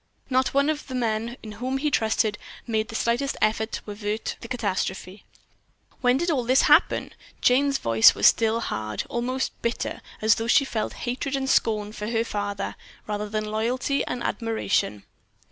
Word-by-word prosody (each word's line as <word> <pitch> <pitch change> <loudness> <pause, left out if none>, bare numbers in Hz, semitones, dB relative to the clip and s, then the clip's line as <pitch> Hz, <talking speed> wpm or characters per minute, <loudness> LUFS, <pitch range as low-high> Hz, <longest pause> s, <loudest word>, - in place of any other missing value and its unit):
Not 260 0 +3
a - - -13
one 280 +2 +3
of 295 -2 -6
the 260 - -5
men 230 0 -1
in 215 - -7
whom 250 +5 -3
he 295 +2 -1
trusted 220 -2 +1 0.3
made 220 -2 -1
the 225 - -8
slightest 240 +5 0
effort 220 +1 +1
to - - -2
help - - -13
avert 210 +1 -3
the - - -8
catastrophe." 195 -4 -3 0.7
"When 250 0 +3
did 345 +4 -1 0.2
this 255 +1 +5
all - - +6
happen?" - - +2 0.3
Jane's 275 +2 +3
voice 115 -1 +5
was - - 0
still 225 0 +4
hard, 110 - -3
almost 255 +2 -1
bitter, 235 +1 -2 0.2
as 220 +1 +5
though 225 0 -3
she 275 +4 +5
felt 225 -4 -3
hatred 260 +3 -2
and 270 -1 -2
scorn 210 -5 +1
for 210 -1 -6
her 230 -1 +1
father, 205 -3 -3 0.3
rather 210 0 -3
than 215 0 -2
loyalty 240 +6 0
and 250 - -3
admiration. 205 - -1
225 Hz, 180 wpm, -25 LUFS, 215-255 Hz, 0.7 s, all